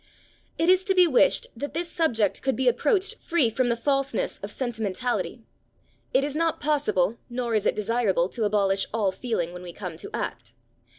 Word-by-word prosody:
It 330 - +1
is 370 +1 +5
to 385 -2 +2
be 365 -1 +7
wished 285 -3 +3
that 285 +5 -6
this 340 +1 -1
subject 235 - 0
could 265 -1 0
be 260 0 0
approached 300 - +2
free 290 -9 +1
from 250 +2 +1
the 235 - +2
falseness 275 - -1
of - - -6
sentimentality. 240 -1 -2 0.7
It 265 - +3
is 285 0 -2
not 330 0 0
possible, 230 -9 +1
nor 240 -1 -2
is 215 -2 +2
it - - +1
desirable 210 -4 +1
to 225 +1 -2
abolish 200 -2 +2
all 205 -4 +1
feeling 185 -6 -3
when 180 - -8
we 175 -1 -8
come 180 -5 -7
to - - -8
act. 115 - -5
240 Hz, 185 wpm, -26 LUFS, 205-290 Hz, 0.7 s, be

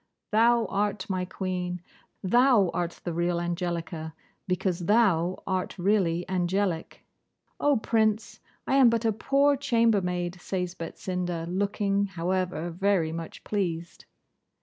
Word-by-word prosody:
Thou 230 +2 +4
art 200 0 -1
my 185 -1 -1
Queen. 180 -1 -3 0.4
Thou 235 -2 +4
art 175 0 -3
the 175 - -3
real 170 +1 0
Angelica, 170 -2 -3 0.3
because 180 -1 0
thou 185 -6 +3
art 185 -1 -2
really 180 -3 +1
angelic.' 180 -1 -1 0.5
'Oh, 290 -2 +3
Prince! 220 -1 0 0.3
I 270 - +2
am 260 -3 +7
but 230 0 0
a 225 - +4
poor 275 +6 +2
chambermaid,' 190 -9 +1
says 180 -2 -3
Betsinda, 180 -1 -4
looking, 200 +2 0
however, 180 -2 -2
very 180 -2 +1
much 165 0 -7
pleased. 175 -5 -3
185 Hz, 120 wpm, -27 LUFS, 175-210 Hz, 0.5 s, am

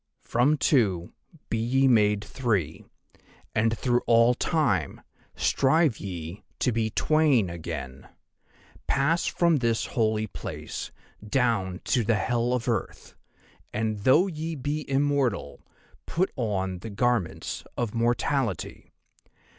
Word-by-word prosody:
"'"From 140 +6 +2
Two 100 - +1 0.4
be 115 - 0
ye 130 +4 +2
made 105 -4 +3
Three, 105 - -2 0.7
and 110 +1 +1
through 120 -1 +1
all 115 +1 +5
Time 125 - 0 0.3
strive 140 -2 +2
ye 90 -1 -7
to 125 - +1
be 115 -1 0
Twain 140 - +2
again. 65 -6 -7 0.8
Pass 140 +5 +1
from 170 -2 +2
this 115 -3 0
Holy 110 -2 0
Place 105 - -6 0.3
down 105 -5 0
to 120 - +1
the 115 +1 +2
Hell 120 +3 0
of 125 -1 -2
Earth, 115 -5 -3 0.6
and 110 -1 -2
though 130 - +5
ye 165 -3 -4
be 145 +2 -3
immortal 140 - 0 0.4
put 185 +3 0
on 95 -7 -2
the 110 - -7
garments 115 -4 -1
of 120 -4 -2
mortality. 120 - -1
115 Hz, 115 wpm, -26 LUFS, 105-135 Hz, 0.8 s, all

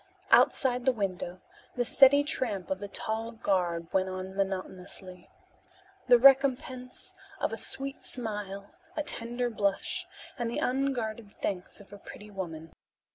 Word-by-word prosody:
Outside 250 -2 +4
the 260 - +5
window 185 -5 -3 0.3
the 245 -1 0
steady 280 +3 +6
tramp 235 - -2
of 190 - -1
the 205 - -5
tall 220 +3 -3
guard 175 -6 -1
went 190 0 +2
on 185 +1 -6
monotonously. 185 -1 -5 0.8
"The 245 - +8
recompense 260 -1 +3 0.3
of - - -1
a - - 0
sweet 275 +1 +2
smile, 205 -4 -4 0.3
a 300 - 0
tender 240 -2 -2
blush 210 - -1 0.3
and 235 -1 -1
the 235 - -3
unguarded 240 -5 -1
thanks 185 -2 -4
of 205 0 -15
a 205 - -10
pretty 210 +1 -11
woman. 165 -5 -6
215 Hz, 135 wpm, -29 LUFS, 190-250 Hz, 0.8 s, The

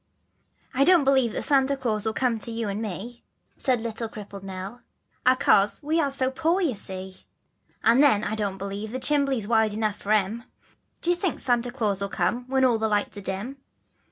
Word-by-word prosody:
I 265 +1 +3
DONT 345 -2 +5
believe 265 -4 +3
that - - -2
Santa 275 -1 +3
Glaus 225 -6 -2
will 220 - 0
come 240 -3 0
to 225 - -4
you 230 -1 -3
and 205 +3 -3
m 215 - -2
e, 240 +2 -11 0.3
Said 255 -4 +1
little 230 0 -4
crippled 205 -3 -9
Nell, 195 +5 -7 0.2
" - - -43
a'cause, 205 -3 +3
we 315 +3 +1
are 285 - +1
so 265 -1 0
poor 330 +6 +1
you 330 -9 +1
see; 190 -2 -5 0.7
And 235 +4 +5
then 240 -8 +4
I 215 - -2
don't 205 -3 -2
believe 200 +2 -5
the 255 +4 -4
'chimbley's' 275 -6 +1
wide 220 -2 +2
enough 215 -1 -1
for 205 - -4
him, 215 +3 0 0.6
D'ye 350 - +3
think 350 -1 -1
that - - -8
Santa 245 -1 +1
Glaus 215 -6 -1
will 200 - -2
come, 245 +5 -1
when 265 0 +2
all 235 -3 +3
the 220 - +1
lights 205 -1 -1
are - - -6
dim. 200 +8 -4
230 Hz, 210 wpm, -25 LUFS, 205-265 Hz, 0.7 s, DONT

